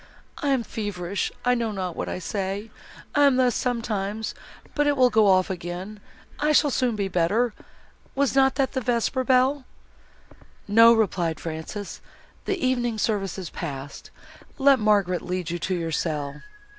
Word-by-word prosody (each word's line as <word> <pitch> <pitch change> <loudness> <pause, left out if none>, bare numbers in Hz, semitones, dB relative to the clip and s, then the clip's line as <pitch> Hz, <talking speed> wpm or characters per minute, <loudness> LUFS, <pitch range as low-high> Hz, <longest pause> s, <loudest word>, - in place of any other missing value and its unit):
I 290 - -2
am 265 -4 +2
feverish, 200 -4 -3
I 250 - +4
know 230 -2 -1
not 185 -4 -4
what - - -4
I - - -3
say. 195 +4 -4 0.4
I 290 0 +5
am 275 - +3
thus, 255 -2 +3
sometimes, 220 -3 -2 0.4
but 295 -1 +1
it 290 -1 +2
will 250 -1 +5
go 215 -1 +4
off 185 0 +3
again, 180 +4 -6 0.4
I 300 +1 +2
shall 295 -1 +4
soon 250 -3 +1
be 200 -2 -1
better. 195 +6 +1 0.6
Was 280 -1 +1
not 270 0 +4
that 270 -1 +1
the 260 - -2
vesper 245 +1 0
bell?" 260 +2 +3 1.0
"No," 230 +3 +7
replied 180 -8 +1
Frances, 165 +5 -6 0.4
"the 395 - -1
evening 245 -6 0
service 200 -4 -1
is 185 -3 -6
passed. 140 -4 -7 0.5
Let 275 -1 +5
Margaret 200 -4 +2
lead 180 -2 -3
you 175 - -3
to 185 +3 -1
your 165 -2 -3
cell." 150 -3 -3
215 Hz, 160 wpm, -25 LUFS, 180-255 Hz, 1.0 s, No